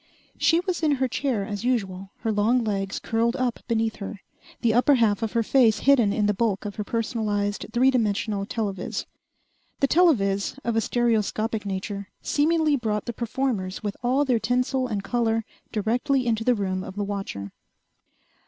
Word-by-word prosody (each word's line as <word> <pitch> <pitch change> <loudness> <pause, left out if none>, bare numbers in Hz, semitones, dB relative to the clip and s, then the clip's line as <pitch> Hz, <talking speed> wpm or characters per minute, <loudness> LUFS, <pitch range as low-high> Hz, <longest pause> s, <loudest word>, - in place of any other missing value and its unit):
She 335 +1 +4
was 365 -2 -2
in 305 -2 +3
her 265 -1 +1
chair 250 -5 -1
as 205 +1 -5
usual, 195 -6 -1
her 225 - 0
long 225 +4 +2
legs 195 -2 -2
curled 230 +1 0
up 255 -3 -1
beneath 225 -1 0
her, 200 0 -6 0.4
the 230 -3 +3
upper 255 +4 +5
half 225 -3 +2
of 225 -2 -2
her 230 -1 +2
face 230 -2 +4
hidden 255 -7 +4
in 210 0 +1
the 210 - +2
bulk 205 -1 -1
of 205 -1 -5
her 210 - -2
personalized, 210 -2 -1
three 255 +3 +4
dimensional 210 -4 0
telovis. 200 -6 -3 0.7
The 275 - +3
telovis, 230 - +2
of 235 -1 -1
a 225 - +3
stereoscopic 220 -2 0
nature, 200 +1 -4
seemingly 310 0 +2
brought 215 -5 -2
the 235 - -4
performers 230 -5 -2
with 205 -1 -3
all 260 +4 +2
their 250 -4 +2
tinsel 250 +2 0
and 205 -4 -3
color 225 -2 0 0.3
directly 245 +5 +1
into 225 -2 0
the 245 +1 +3
room 185 -3 -2
of 190 - -8
the 205 - -2
watcher. 195 - -5
225 Hz, 170 wpm, -25 LUFS, 205-250 Hz, 0.7 s, upper